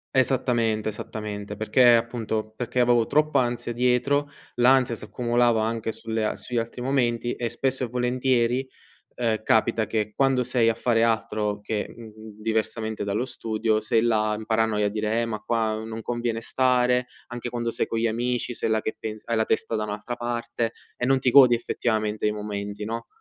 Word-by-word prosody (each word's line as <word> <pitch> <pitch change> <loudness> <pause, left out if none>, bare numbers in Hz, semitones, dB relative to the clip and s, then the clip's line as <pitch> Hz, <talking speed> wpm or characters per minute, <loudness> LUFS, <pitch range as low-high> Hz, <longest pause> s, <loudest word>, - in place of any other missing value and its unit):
Esattamente, 120 -5 +1
esattamente, 105 -1 -6
perché, 120 +2 +5
appunto, 110 -2 -2
perché 125 0 -3
avevo 120 -2 +4
troppa 150 -3 +3
ansia 120 -1 -2
dietro. 125 +4 +1 0.3
L'ansia 125 -1 +4
si - - -11
accumulava 120 +1 +1
anche 115 0 -2
sulle 110 -1 -2
sugli 120 -1 -5
altri 115 +2 -3
momenti 120 -2 0
e, 120 -1 -2
spesso 130 +2 -1
e - - -1
volentieri, 125 +1 +1 0.5
ehm, 110 -3 -1
capita 110 0 +2
che, 105 -1 -2
quando 135 -2 +2
sei 120 -2 +2
a 110 - 0
fare 115 -1 +2
altro 110 -2 0
che, 105 0 -4
mhmm, 115 -2 -11 0.3
diversamente 110 0 -2
dallo 100 +4 -1
studio, 110 -3 -1
sei 110 +1 +2
là, 110 -2 +2
in 110 - -8
paranoia 110 -2 +1
a 105 - +2
dire: 110 +2 -1
“Eh, - - 0
ma 110 -2 -4
qua 110 -2 0
non 110 0 -6
conviene 120 -1 -2
stare”. 125 0 +2 0.2
Anche 120 0 -5
quando 120 -1 -2
sei - - -1
con 115 - -2
gli 115 - +2
amici, 120 +2 -1
sei 115 - -2
là 110 0 +2
che 110 - -3
pensi 110 -1 -6
hai 115 - 0
la 110 0 +2
testa 115 - 0
da 110 - -1
un'altra 105 +3 -4
parte 120 -1 -2 0.2
e 125 - -2
non 135 0 +3
ti 130 -1 +2
godi, 130 -3 +8
effettivamente, 110 -3 -1
i 105 - +3
momenti, 105 0 -5
no, 115 +1 -4
115 Hz, 180 wpm, -25 LUFS, 110-125 Hz, 0.5 s, godi